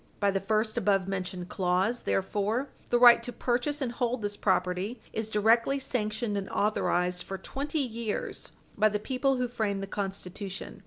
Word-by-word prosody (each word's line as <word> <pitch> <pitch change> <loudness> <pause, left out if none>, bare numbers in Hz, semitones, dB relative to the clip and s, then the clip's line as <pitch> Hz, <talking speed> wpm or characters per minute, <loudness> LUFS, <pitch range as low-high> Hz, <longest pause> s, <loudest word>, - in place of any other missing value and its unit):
By 200 -1 +3
the 195 - 0
first 215 +3 0
above 195 -3 +2
mentioned 185 -2 -4
clause, 190 +6 +1
therefore, 210 +7 0 0.2
the 240 - +4
right 240 -1 +8
to 245 - -4
purchase 260 +5 -1
and 245 - -2
hold 240 -1 -1
this 205 0 -2
property 190 +4 0
is 220 0 -3
directly 225 +5 +3
sanctioned 220 -4 -2
and 195 - -6
authorized 180 -4 +1
for 195 - -5
twenty 285 - -3
years 230 -4 -3 0.2
by 215 +1 +4
the 210 - 0
people 265 +5 0
who 250 -1 0
framed 205 -5 -2
the - - -1
Constitution. 195 0 -5
215 Hz, 165 wpm, -29 LUFS, 195-240 Hz, 0.2 s, right